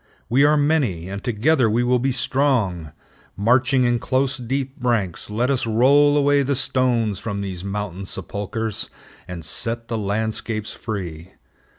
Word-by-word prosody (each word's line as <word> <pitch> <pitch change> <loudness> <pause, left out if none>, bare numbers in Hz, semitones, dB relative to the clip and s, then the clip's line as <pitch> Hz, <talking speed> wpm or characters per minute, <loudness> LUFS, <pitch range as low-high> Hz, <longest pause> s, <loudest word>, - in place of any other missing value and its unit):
We 130 +5 +4
are 150 +1 +4
many, 140 - +1
and 100 0 -6
together 125 +2 +2
we 115 +3 +1
will 125 0 +2
be 135 +2 0
strong. 120 - 0 0.5
Marching 125 +5 +3
in 120 -1 +2
close, 135 +4 +1
deep 130 +2 -3
ranks, 115 -9 -1
let 120 +5 0
us 130 -4 0
roll 140 +6 +4
away 145 0 +3
the 140 +1 0
stones 120 -6 +1
from 100 -3 -4
these 95 -3 -5
mountain 100 -1 -4
sepulchers, 100 +4 -3 0.4
and 85 -3 -7
set 115 +7 0
the 115 -2 -2
landscapes 110 +1 -2
free. 90 -6 -6
115 Hz, 150 wpm, -22 LUFS, 100-130 Hz, 0.5 s, We